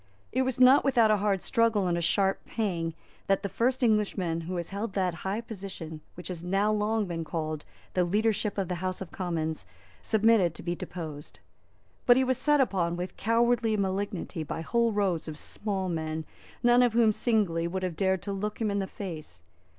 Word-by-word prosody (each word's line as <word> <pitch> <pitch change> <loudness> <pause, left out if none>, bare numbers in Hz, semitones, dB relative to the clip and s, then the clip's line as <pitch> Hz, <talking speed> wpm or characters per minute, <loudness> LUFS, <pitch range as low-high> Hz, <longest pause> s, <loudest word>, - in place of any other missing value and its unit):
It 260 - +1
was 260 -1 -1
not 255 +2 +7
without 240 -6 +4
a 210 - +4
hard 200 -2 0
struggle 230 -5 +2
and 175 -1 +1
a 170 - -1
sharp 195 +3 +1
pang 170 -7 -2 0.3
that 195 0 +2
the - - 0
first 255 +6 0
Englishman 200 -7 +1
who 175 +3 -5
has 170 0 -4
held 200 +1 -3
that 185 -2 0
high 200 +4 -2
position 190 -8 -7
which 175 - -8
has 175 -3 -5
now 195 +4 +2
been 215 - +1
long 210 -6 0
called 155 -2 -4 0.3
the 180 - +3
Leadership 210 +3 0
of 195 -2 0
the 180 -1 -4
House 185 0 -2
of 190 - -6
Commons 160 - -3 0.3
submitted 220 -6 +3
to - - -9
be 175 - -1
deposed. 155 -4 -7 0.7
But 245 0 +8
he 260 - +4
was 260 -1 0
set 295 -1 +3
upon 180 -9 +1
with 180 +1 -5
cowardly 230 0 +2
malignity 195 -3 -2
by 155 +1 -4
whole 235 +6 +1
rows 190 -6 0
of 155 -1 -6
small 195 +2 -3
men 160 -2 -3 0.4
none 240 +1 +6
of 245 -2 +3
whom 230 -2 +5
singly 200 -8 +1
would 185 +2 -3
have 180 -3 -2
dared 190 0 +1
to 200 - -3
look 210 +2 -3
him 220 -3 0
in 200 - 0
the 195 - -2
face. 155 - -7
195 Hz, 195 wpm, -28 LUFS, 170-220 Hz, 0.7 s, But